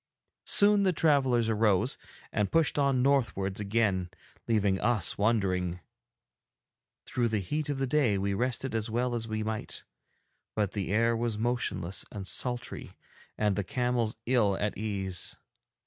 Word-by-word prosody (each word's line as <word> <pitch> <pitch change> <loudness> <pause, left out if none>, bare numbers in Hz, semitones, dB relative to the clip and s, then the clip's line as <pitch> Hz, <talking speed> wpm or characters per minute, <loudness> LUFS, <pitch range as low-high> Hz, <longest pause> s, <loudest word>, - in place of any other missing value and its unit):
Soon 205 0 +5
the 190 -2 +3
travellers 135 -8 +3
arose 105 -4 +2 0.3
and 105 -2 0
pushed 165 -2 +2
on 135 -3 +2
northwards 105 -9 +1
again, 100 -4 0 0.4
leaving 100 -4 +2
us 110 -5 +2
wondering. 95 -5 0 1.3
Through 120 -2 0
the 110 -1 0
heat 150 - -3
of 145 - -1
the 135 - 0
day 125 -6 +2
we 100 +1 -1
rested 125 +4 -1
as 110 0 -1
well 120 +2 0
as 115 -1 -3
we 110 -1 -2
might, 110 0 -3 0.7
but 105 -3 0
the 100 -3 -3
air 115 +2 +3
was 115 -2 -1
motionless 115 -6 -1
and 100 -2 -6
sultry 120 +4 -3 0.5
and 105 -2 +1
the 105 - -1
camels 120 +1 -1
ill 115 -6 +2
at 105 0 -1
ease. 95 -4 -2
110 Hz, 145 wpm, -29 LUFS, 100-125 Hz, 1.3 s, Soon